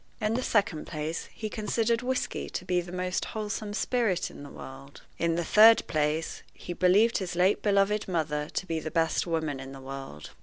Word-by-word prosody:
In 215 -1 0
the 250 - 0
second 200 -10 0
place, 155 +1 -4
he 220 - -5
considered 225 +2 0
whisky 255 +1 -2
to 185 - -5
be 180 -1 +1
the 175 0 -10
most 180 0 -2
wholesome 210 -1 -4
spirit 225 -7 0
in - - -11
the 145 - -9
world. 135 +1 -11 0.2
In 170 -1 +1
the 170 - 0
third 225 +4 +7
place, 155 +1 -1
he 175 - -6
believed 190 +6 +4
his 180 -2 -4
late 185 +3 +3
beloved 205 0 +2
mother 150 -4 -1
to - - -3
be 165 -3 -2
the 155 - -5
best 165 +1 +1
woman 160 -4 -1
in 135 0 -8
the 135 - -9
world. 135 - -8
180 Hz, 195 wpm, -28 LUFS, 155-210 Hz, 0.2 s, third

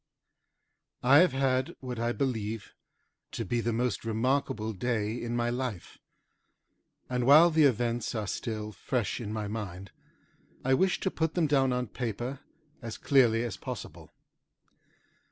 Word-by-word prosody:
I 130 +3 +7
have 180 -3 +5
had 130 -1 0
what 125 -3 -6
I 120 +1 0
believe 115 -5 -3 0.6
to - - -3
be 120 -1 0
the 120 - 0
most 120 +2 -1
remarkable 115 -1 0
day 110 0 -1
in 120 0 -3
my 120 0 0
life, 120 -7 -5 1.1
and 125 -1 -1
while 160 +5 +8
the 155 -1 +5
events 120 -2 0
are 110 -2 -2
still 110 +1 -4
fresh 120 +2 -2
in 105 -2 -5
my 110 -1 -3
mind, 100 -3 -6 0.7
I 130 - +3
wish 185 +7 +2
to 190 - 0
put 160 -1 -1
them 175 -3 +3
down 135 -3 +3
on 125 0 0
paper 120 +4 -4 0.4
as 115 -3 -6
clearly 120 -5 +3
as 120 - -4
possible. - - -8
120 Hz, 145 wpm, -29 LUFS, 110-135 Hz, 1.1 s, while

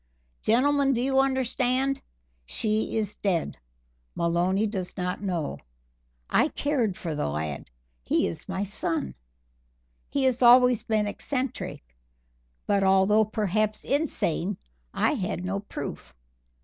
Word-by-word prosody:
Gentlemen, 275 +4 +3
do 240 - 0
you 265 0 +2
understand? 265 0 +1 0.5
She 215 - -1
is 210 -1 -2
dead. 175 - -1 0.6
Maloney 175 +5 +1
does 195 -4 -4
not 180 0 -2
know. 175 -6 -2 0.7
I - - +3
cared 250 -10 -1
for 165 -3 -4
the 150 - -1
lad. 75 0 -4 0.3
He - - +1
is 85 - -5
my 190 +1 -1
son. 165 - -2 1.0
He 270 -2 +1
always 250 -1 +7
has - - -20
been 215 -2 +2
eccentric, 255 - -3 0.8
but 200 -1 +2
although 195 +3 +4
perhaps 215 0 -1
insane, 205 - 0 0.3
I - - +2
had 190 - -3
no 195 +2 -1
proof. 65 - -7
210 Hz, 120 wpm, -27 LUFS, 180-250 Hz, 1.0 s, always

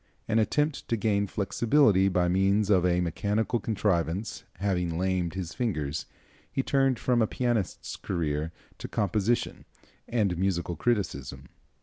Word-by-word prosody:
An 110 0 +2
attempt 150 +7 0
to 115 - 0
gain 100 -1 +1
flexibility 100 - +3
by 90 -2 +2
means 100 +3 +2
of 90 -2 +4
a 90 0 +2
mechanical 105 +7 0
contrivance 100 -2 -1
having 90 -4 -1
lamed 90 -2 0
his 90 -3 -4
fingers, 80 - -2 0.4
he 135 - -1
turned 135 -2 +2
from 120 0 +1
a 110 - +3
pianist's 120 -7 -2
career 80 -3 -2 0.3
to - - -5
composition 105 +3 0 0.4
and 100 -7 0
musical 90 -2 0
criticism. 70 - -2
95 Hz, 130 wpm, -28 LUFS, 85-110 Hz, 0.4 s, of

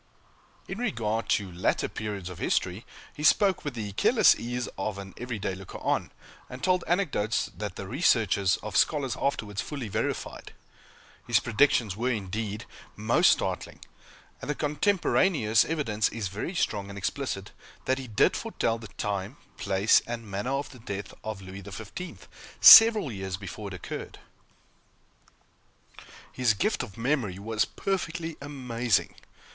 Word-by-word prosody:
In 195 - -5
regard 115 - -1
to 100 -3 +1
later 90 +2 0
periods 105 -4 -5
of 90 -2 -8
history, 95 +5 -1 0.3
he 150 - -9
spoke 190 +4 +4
with 145 -4 -4
the 105 -3 -4
careless 95 - +5
ease 120 +1 -4
of 110 -2 -3
an 95 -1 -8
every 125 -2 -5
day 95 -1 -3
looker 95 0 -9
on; - - -1 0.4
and 125 - -9
told 185 -1 +2
anecdotes 155 - 0
that - - -5
the - - -7
researches 95 -3 +2
of 110 - -6
scholars 140 -5 +2
afterwards 105 -7 -1
fully 140 -7 -5
verified. - - -3 0.7
His - - +4
predictions 115 -4 +2
were, 120 +4 -1
indeed, 105 -1 -3 0.3
most - - +4
startling; - - -4 0.6
and - - -7
the 150 - 0
cotemporaneous 150 - +2
evidence 115 -10 0
is 110 -3 -4
very 105 - -5
strong 100 - -1
and 100 - -8
explicit, 100 -1 -3 0.3
that 130 +1 +1
he 130 - -7
did 110 - +3
foretell 115 0 -1
the 115 - -9
time, 100 +5 -3 0.2
place, 100 +3 +3
and 115 -1 -5
manner 100 +4 -4
of 140 +1 -3
the 130 - -13
death 100 -3 -6
of 110 -3 -5
Louis 95 +1 -9
XV, 110 - -8 0.3
several 220 - +10
years 95 -3 -4
before 100 +2 -7
it 100 - -6
occurred. 90 - -7 2.1
His 120 -4 +2
gift 215 - 0
of 120 -5 -8
memory 115 -6 -1
was 110 +2 0
perfectly 165 -4 -3
amazing. 125 - -1
115 Hz, 145 wpm, -27 LUFS, 100-140 Hz, 2.1 s, several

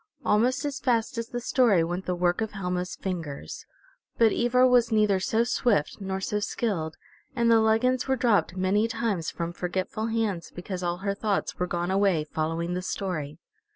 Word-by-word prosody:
Almost 250 +7 +2
as 285 -1 -3
fast 235 0 0
as 230 - -4
the 240 - -4
story 235 -7 +3
went 175 +3 -4
the 180 - 0
work 175 +2 +1
of 220 -1 -3
Helma's 180 -2 -3
fingers. 165 -7 -6 0.5
But 225 -2 +5
Ivra 250 +2 +3
was 245 -2 +4
neither 210 -3 +3
so 225 +3 +1
swift 235 -9 +1
nor 190 -1 -3
so 210 +2 -1
skilled, 185 -7 -2 0.4
and 235 -2 +3
the 225 - +6
leggins 225 +4 +2
were 265 - +2
dropped 225 -7 +1
many 195 +4 +2
times 220 -7 -2
from 170 0 -4
forgetful 185 +5 -3
hands 220 -7 -2
because 180 +1 -5
all 175 0 -1
her 200 - +1
thoughts 205 0 -2
were 180 - 0
gone 175 +1 -2
away 190 -5 +2
following 165 +3 -2
the 180 - -2
story. 165 -6 -4
200 Hz, 180 wpm, -27 LUFS, 180-230 Hz, 0.5 s, the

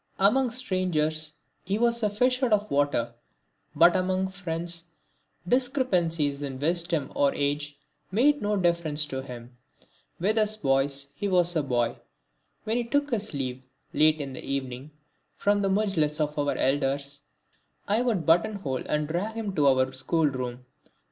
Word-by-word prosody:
Among 240 +7 +3
strangers 170 -10 -1 0.3
he 195 +3 -1
was 235 0 +2
as 210 -2 +1
a - - -13
fish 250 +3 +2
out 245 -4 +2
of 210 0 +1
water, 140 -5 +1 0.6
but 170 +1 +6
among 185 +1 0
friends 170 -2 -4 0.6
discrepancies 180 - +1
in 135 -2 -4
wisdom 165 0 -1
or 140 -1 +2
age 145 +1 -2 0.3
made 280 +9 +3
no 210 0 0
difference 170 -4 +1
to 130 -2 -4
him. 120 -2 -10 0.6
With 210 +5 +2
us 215 0 +1
boys 140 -3 0
he 200 +8 -3
was 175 -2 +2
a 160 - +3
boy. 120 -4 0 0.7
When 225 +2 -1
he 245 - 0
took 285 +4 0
his 215 -7 -1
leave, 130 -2 -3 0.3
late 155 0 +4
in 140 -2 -5
the - - -7
evening, 135 0 -4 0.5
from 205 0 +1
the 195 - +1
mujlis 190 -7 +1
of 150 -1 -1
our 145 0 0
elders, 140 +1 0 0.7
I 210 +4 +2
would 225 -9 0
buttonhole 170 -5 +1
and 150 0 0
drag 185 +8 -2
him 215 -4 -3
to 145 -2 +3
our 130 -1 +3
school 160 +5 0
room. 125 -3 -3
165 Hz, 155 wpm, -27 LUFS, 140-205 Hz, 0.7 s, but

